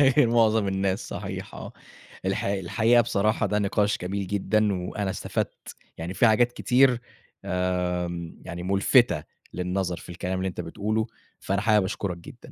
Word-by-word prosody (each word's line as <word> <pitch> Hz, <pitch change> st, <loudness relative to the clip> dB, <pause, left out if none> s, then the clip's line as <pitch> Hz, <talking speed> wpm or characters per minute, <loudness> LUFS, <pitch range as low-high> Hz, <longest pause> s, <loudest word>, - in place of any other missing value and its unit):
غير 135 Hz, -2 st, +5 dB
مُعظم 110 Hz, -3 st, +3 dB
الناس 95 Hz, 0 st, -1 dB
صحيح -, -, -6 dB
آه. -, -, -8 dB, 0.5 s
الحقي 95 Hz, +1 st, 0 dB
الحقيقة 115 Hz, +6 st, +3 dB
بصراحة 110 Hz, -2 st, +1 dB
ده 105 Hz, -, 0 dB
نقاش 105 Hz, 0 st, +1 dB
جميل 95 Hz, +2 st, -3 dB
جدًا 100 Hz, -1 st, +1 dB
وأنا 100 Hz, 0 st, -2 dB
استفدت، -, -, -4 dB, 0.2 s
يعني 85 Hz, +3 st, -4 dB
في 115 Hz, -, +4 dB
حاجات 120 Hz, +2 st, +4 dB
كتير 125 Hz, -1 st, +3 dB, 0.9 s
آمم 85 Hz, -1 st, -4 dB
يعني 85 Hz, +1 st, -6 dB
مُلفتة 100 Hz, -, +3 dB, 0.3 s
للنظر 90 Hz, -1 st, -2 dB
في -, -, -12 dB
الكلام 90 Hz, +2 st, -3 dB
اللي 95 Hz, -, -1 dB
أنت 90 Hz, -, -4 dB
بتقوله 110 Hz, +2 st, -2 dB, 0.3 s
فأنا 100 Hz, +1 st, -1 dB
حابب 105 Hz, -3 st, +4 dB
أشكرك 95 Hz, -2 st, -3 dB
جدًا. 85 Hz, -, -13 dB
100 Hz, 150 wpm, -26 LUFS, 90-110 Hz, 0.9 s, غير